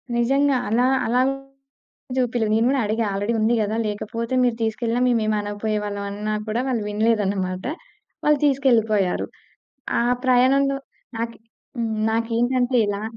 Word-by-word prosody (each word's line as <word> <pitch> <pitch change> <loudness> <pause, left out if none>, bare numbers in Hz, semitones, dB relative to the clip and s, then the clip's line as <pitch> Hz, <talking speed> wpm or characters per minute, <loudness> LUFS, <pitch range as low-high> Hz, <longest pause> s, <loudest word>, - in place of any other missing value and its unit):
నిజంగా. 270 +3 +2
అలా 235 +3 +2 0.2
అలాగే 255 +3 +2 0.8
చూపియలే 240 -3 +1
నేను 225 +1 +3
కూడా 270 -1 +2
అడిగా 220 +2 0
ఆల్రెడీ 205 +4 -1
ఉంది 220 +2 +2
కదా! 210 +1 -1
లేకపోతే 230 +3 -4
మీరు 245 -2 +2
తీసుకెళ్ళిన 230 +2 -1
మేము 240 -2 +2
ఏమనకపోయే 210 0 -1
వాళ్ళం 205 -1 -4
అన్న 210 +1 -3
కూడా 220 +3 -1
వాళ్ళు 240 -5 -1
వినలేదన్నమాట. 205 -4 0 0.6
వాళ్ళు 300 -1 +4
తీసుకెళ్ళిపోయారు. 225 -9 +2 0.7
ఆ - - +2 0.2
ప్రయాణంలో 270 +2 +3 0.4
నాకు 230 0 -3 0.4
హ్మ్. 230 -1 -1 0.2
నాకేంటి 230 +2 0
అంటే 245 +1 +1
ఎలా 205 0 -2
230 Hz, 130 wpm, -22 LUFS, 210-250 Hz, 0.8 s, వాళ్ళు